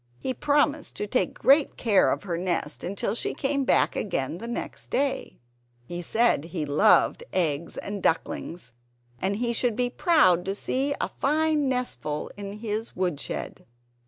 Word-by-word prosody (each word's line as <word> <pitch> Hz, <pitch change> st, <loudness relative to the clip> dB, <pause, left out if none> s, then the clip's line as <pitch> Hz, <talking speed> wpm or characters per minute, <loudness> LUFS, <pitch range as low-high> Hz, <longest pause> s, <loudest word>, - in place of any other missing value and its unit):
He 260 Hz, -, -3 dB
promised 290 Hz, +1 st, +1 dB
to -, -, -3 dB
take 230 Hz, +5 st, 0 dB
great 280 Hz, +2 st, +4 dB
care 210 Hz, -5 st, +4 dB
of -, -, -2 dB
her 180 Hz, -4 st, -2 dB
nest 170 Hz, -4 st, -2 dB
until 200 Hz, +2 st, -2 dB
she 235 Hz, -, 0 dB
came 275 Hz, -1 st, 0 dB
back -, -, +3 dB
again 165 Hz, -4 st, -2 dB
the 230 Hz, -, -6 dB
next 235 Hz, -, -5 dB
day. 275 Hz, 0 st, -1 dB, 0.5 s
He 175 Hz, +6 st, -5 dB
said 220 Hz, -3 st, +2 dB
he 165 Hz, -2 st, -3 dB
loved 180 Hz, -, +4 dB
eggs 165 Hz, -2 st, -1 dB
and 200 Hz, -1 st, -5 dB
ducklings; 165 Hz, -1 st, -2 dB, 0.5 s
he 215 Hz, +5 st, 0 dB
should 235 Hz, -1 st, +1 dB
be 245 Hz, +1 st, 0 dB
proud 260 Hz, -, +4 dB
to 195 Hz, +1 st, -2 dB
see 275 Hz, +6 st, -1 dB
a -, -, 0 dB
fine 300 Hz, 0 st, +1 dB
nestful 250 Hz, -, -3 dB
in 200 Hz, -1 st, -6 dB
his 215 Hz, +1 st, -4 dB
woodshed. 180 Hz, -6 st, -3 dB
210 Hz, 155 wpm, -26 LUFS, 175-265 Hz, 0.5 s, great